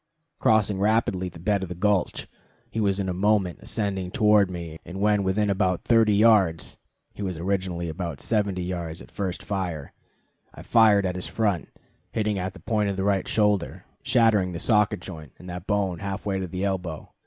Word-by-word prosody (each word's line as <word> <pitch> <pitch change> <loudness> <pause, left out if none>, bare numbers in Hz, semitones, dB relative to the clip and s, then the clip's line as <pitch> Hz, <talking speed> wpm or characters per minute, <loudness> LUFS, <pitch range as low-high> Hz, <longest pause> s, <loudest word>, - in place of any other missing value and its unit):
Crossing 105 -3 +3
rapidly 100 -3 +1
the 85 - -13
bed 100 +4 0
of 95 - -5
the 90 - -5
gulch, 100 +1 0 0.4
he 115 - -3
was 100 -2 +1
in 95 - -1
a 90 - -1
moment 95 -1 +1
ascending 95 -4 -2
toward 105 0 +4
me, 85 -3 -7
and 90 +3 -8
when 105 0 +3
within 100 +2 +1
about 95 -3 0
thirty 115 -3 +4
yards 100 -7 +3 0.3
(he - - -9
was 95 -4 -3
originally 90 -1 -2
about 85 -3 -5
seventy 100 -5 0
yards 85 -2 -4
at - - -13
the - - -27
first 95 -3 -3
fire) 90 -8 -4 0.6
I - - -10
fired 110 -4 +5
at 90 - -1
his 90 0 -5
front, 105 -7 -1 0.4
hitting 105 -2 0
at 95 +1 -3
the - - -11
point 105 -2 0
of 100 - -3
the 95 - -1
right 100 -1 +1
shoulder, 105 -4 0 0.2
shattering 105 -6 +3
the 85 - -4
socket 105 -2 +2
joint 80 -7 -9
and 90 - -13
that 90 +1 -7
bone 100 -4 0
half 100 -1 -5
way 100 -2 -1
to 95 - -3
the 95 +2 -3
elbow. 90 -5 -4
95 Hz, 195 wpm, -25 LUFS, 90-105 Hz, 0.6 s, fired